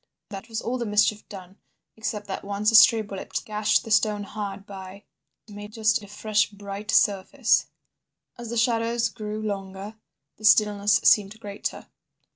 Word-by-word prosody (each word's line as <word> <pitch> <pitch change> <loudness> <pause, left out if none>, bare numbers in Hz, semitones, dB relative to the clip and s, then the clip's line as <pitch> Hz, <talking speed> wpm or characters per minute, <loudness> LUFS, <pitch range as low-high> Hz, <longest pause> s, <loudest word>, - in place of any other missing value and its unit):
That 200 +2 -9
was 225 -1 -4
all 250 +2 -2
the 235 - -2
mischief 210 0 +1
done, 190 -1 -11 0.4
except 210 -1 -4
that 195 - -6
once 205 +2 0
a - - +2
stray 220 0 +7
bullet 200 -2 -5
gashed 215 0 +1
the 225 - -9
stone 215 -1 +2
hard 200 -1 -6
by—made 205 +2 -12
just 220 -1 +1
a 205 - -12
fresh 210 +1 0
bright 200 0 -8
surface. 205 +6 +2 0.7
"As 240 -2 -9
the 235 - -3
shadows 230 0 +1
grew 215 -1 -6
longer, 200 0 -6 0.4
the 215 - -8
stillness 210 -2 +4
seemed 210 +1 +3
greater. 205 -2 -6
210 Hz, 150 wpm, -25 LUFS, 200-220 Hz, 0.7 s, stray